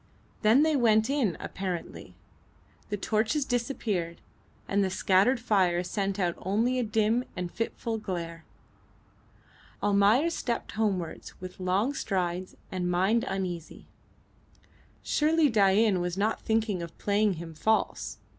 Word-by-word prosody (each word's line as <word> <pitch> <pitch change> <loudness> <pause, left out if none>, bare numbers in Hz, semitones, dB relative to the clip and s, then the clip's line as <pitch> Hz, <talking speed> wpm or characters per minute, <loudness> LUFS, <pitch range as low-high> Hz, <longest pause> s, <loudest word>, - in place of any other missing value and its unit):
Then 230 +7 +5
they 315 -1 +2
went 220 -1 +3
in 255 - +1
apparently. 185 -3 -5 0.7
The 205 - -2
torches 225 +8 0
disappeared, 225 -9 -2 0.5
and 200 0 +2
the 190 - 0
scattered 195 +7 +3
fire 185 -6 +2
sent 195 +1 -2
out 175 -3 +1
only 230 +7 +1
a - - +1
dim 220 +2 +1
and 180 -2 -4
fitful 230 0 -3
glare. 170 -5 -5 1.4
Almayer 205 +10 +4
stepped 240 -7 -3
homewards 195 -6 -3
with 185 0 -9
long 190 +8 +1
strides 185 -6 -2 0.2
and 180 -1 -2
mind 195 +7 +2
uneasy. 180 -4 -4 1.2
Surely 310 0 +3
Dain 200 -2 +3
was 175 +1 -2
not 210 +2 0
thinking 220 -4 0
of 170 -1 -8
playing 205 0 +2
him 165 -1 -8
false. 220 +8 0
205 Hz, 125 wpm, -28 LUFS, 180-225 Hz, 1.4 s, Then